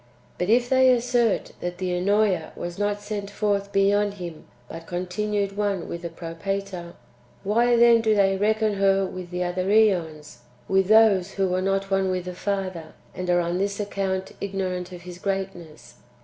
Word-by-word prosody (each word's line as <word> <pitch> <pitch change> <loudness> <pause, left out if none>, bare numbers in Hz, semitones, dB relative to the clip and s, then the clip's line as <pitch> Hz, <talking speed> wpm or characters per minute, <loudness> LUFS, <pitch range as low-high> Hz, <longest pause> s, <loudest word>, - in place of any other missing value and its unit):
But 180 - -1
if 240 +2 +4
they 260 0 +5
assert 245 -2 +1
that 175 0 -4
the 180 -1 -2
(Ennoea) 195 -2 +1
was 175 +2 -6
not 205 0 -1
sent 205 -1 -5
forth 205 -1 -1
beyond 200 +1 +2
Him, 175 -4 -8 0.2
but 165 +3 -9
continued 195 +3 -2
one 200 -3 -1
with 170 - -6
the 170 - -5
Propator, 175 +2 -5 0.5
why 235 +4 +3
then 235 -1 +6
do 220 -1 +2
they 195 -1 +3
reckon 215 +1 +1
her 195 0 +3
with 185 -1 -7
the 180 0 -2
other 180 +1 -2
^ons 175 - +1
— 125 - -31
with 190 -1 +2
those 210 -3 +5
who 195 -1 0
were 185 +1 0
not 195 +1 -1
one 195 -1 +2
[with 185 -1 -2
the 180 - -5
Father], 185 -4 -4 0.2
and 180 0 -5
are 175 0 +3
on 175 +1 -2
this 200 +1 -1
account 195 -2 -2
ignorant 185 -2 -3
of 175 -1 -10
His 180 0 -9
greatness 185 -9 -5
195 Hz, 175 wpm, -24 LUFS, 180-205 Hz, 0.5 s, then